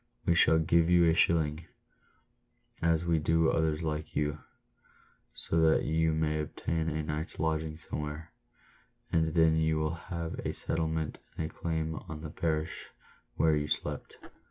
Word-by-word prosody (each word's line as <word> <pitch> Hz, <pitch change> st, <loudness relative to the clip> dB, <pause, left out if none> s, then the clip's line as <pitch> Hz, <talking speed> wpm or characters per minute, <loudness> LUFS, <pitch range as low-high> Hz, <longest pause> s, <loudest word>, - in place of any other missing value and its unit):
We 85 Hz, -, +4 dB
shall 80 Hz, -1 st, +5 dB
give 80 Hz, +1 st, +3 dB
you 85 Hz, -1 st, +5 dB
a 80 Hz, -, +5 dB
shilling, 80 Hz, -1 st, +2 dB, 1.1 s
as 85 Hz, 0 st, +2 dB
we 85 Hz, -2 st, +2 dB
do 80 Hz, +1 st, +3 dB
others 80 Hz, 0 st, 0 dB
like 75 Hz, -1 st, -3 dB
you, 75 Hz, 0 st, 0 dB, 1.0 s
so 80 Hz, -, 0 dB
that 80 Hz, -1 st, +4 dB
you 80 Hz, +1 st, +2 dB
may 80 Hz, 0 st, 0 dB
obtain 80 Hz, +2 st, -2 dB
a 80 Hz, 0 st, -2 dB
night's 75 Hz, +2 st, -4 dB
lodging 80 Hz, -1 st, -1 dB
somewhere, 75 Hz, 0 st, -6 dB, 0.8 s
and 80 Hz, -1 st, +1 dB
then 80 Hz, -1 st, +5 dB
you 80 Hz, 0 st, +2 dB
will 80 Hz, +1 st, 0 dB
have 85 Hz, -1 st, -5 dB
a -, -, -3 dB
settlement 80 Hz, -1 st, -2 dB, 0.2 s
and 80 Hz, 0 st, -3 dB
a -, -, -26 dB
claim 80 Hz, -1 st, -2 dB
on 75 Hz, -1 st, -6 dB
the 75 Hz, -1 st, -6 dB
parish 80 Hz, -1 st, -2 dB, 0.5 s
where 80 Hz, -1 st, +3 dB
you 75 Hz, 0 st, -1 dB
slept." -, -, -3 dB
80 Hz, 155 wpm, -30 LUFS, 75-80 Hz, 1.1 s, shall